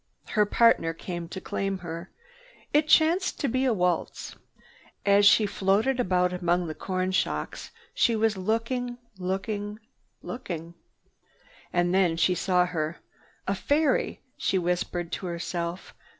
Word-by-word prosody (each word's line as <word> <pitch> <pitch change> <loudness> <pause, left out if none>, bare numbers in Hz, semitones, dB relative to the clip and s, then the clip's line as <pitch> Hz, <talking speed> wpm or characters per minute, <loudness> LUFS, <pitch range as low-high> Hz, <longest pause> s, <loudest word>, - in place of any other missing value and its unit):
Her 210 -2 +2
partner 205 -7 +4
came 175 -1 -5
to 190 - -6
claim 195 +1 -2
her. 170 0 -7 0.6
It 300 +1 +4
chanced 330 +5 +3
to 280 - 0
be 255 +2 +1
a 255 - +3
waltz. 180 -5 -1 0.7
As 200 0 +6
she 210 +2 +6
floated 205 +7 +1
about 180 -4 +2
among 175 0 +1
the 160 - -4
corn 185 +2 -2
shocks, 80 - -2 0.2
she 230 - +3
was 220 -1 +2
looking, 230 +5 -1 0.2
looking, 205 +3 -3 0.5
looking. 170 -8 -6 1.0
And 175 0 +1
then 180 -4 +3
she 175 +2 +3
saw 180 0 +2
her. 160 -2 -3 0.5
"A 195 - +2
fairy!" 285 +7 +1 0.2
she 190 - +1
whispered 175 -1 -1
to 185 - -4
herself. 170 +1 -4
190 Hz, 135 wpm, -27 LUFS, 175-220 Hz, 1.0 s, As